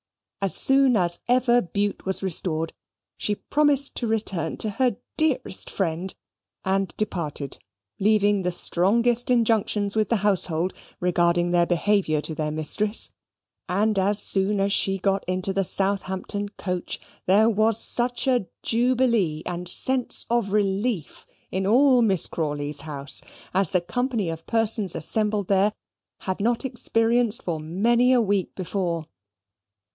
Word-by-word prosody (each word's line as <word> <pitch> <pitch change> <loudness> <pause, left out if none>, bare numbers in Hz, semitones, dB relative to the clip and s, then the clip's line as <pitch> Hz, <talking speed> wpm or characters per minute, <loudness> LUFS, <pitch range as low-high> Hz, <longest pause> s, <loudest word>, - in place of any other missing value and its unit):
As 195 -2 +1
soon 270 -3 +4
as 175 -2 -1
ever 245 0 +3
Bute 200 +3 -2
was 190 0 -2
restored, 165 -3 -2 0.5
she 210 - 0
promised 285 +2 +2
to 240 - -1
return 195 -7 -1
to 215 - -1
her 245 0 0 0.2
dearest 280 -10 0
friend, 180 0 -3 0.5
and 195 0 +1
departed, 155 -9 -3 0.4
leaving 205 -1 +3
the 180 - 0
strongest 230 +8 +1
injunctions 220 -4 +1
with 215 -1 +1
the 235 - +3
household 180 -3 +1 0.3
regarding 175 0 +2
their 175 -1 +3
behaviour 175 -3 +1
to 160 - -5
their 155 0 -2
mistress; 155 +8 -1 0.6
and 205 +3 +1
as 200 +2 +2
soon 200 +1 +1
as 200 +1 +1
she 195 -1 +2
got 195 +1 0
into 185 +1 -1
the 195 0 +1
Southampton 195 +1 -1
coach, 180 -3 -4 0.3
there 205 +4 +5
was 220 0 +2
such 245 +1 -1
a 250 -7 +1 0.2
jubilee 230 -9 +1
and 175 0 -5
sense 260 +5 +2
of 235 -4 +1
relief 200 - -1 0.2
in 190 0 -1
all 255 +3 +5
Miss 195 -7 +1
Crawley's 145 -2 -3
house, 145 -2 -3 0.3
as 190 -2 +2
the 180 - +1
company 225 +2 -2
of 165 0 -9
persons 225 -4 +1
assembled 210 +4 -1
there 200 +2 +2 0.5
had 185 -1 -3
not 235 +5 0
experienced 235 -2 +1
for 165 -3 -2
many 230 +11 +2
a 255 - +5
week 200 -4 0
before. 175 -3 -2
200 Hz, 140 wpm, -24 LUFS, 180-230 Hz, 0.6 s, there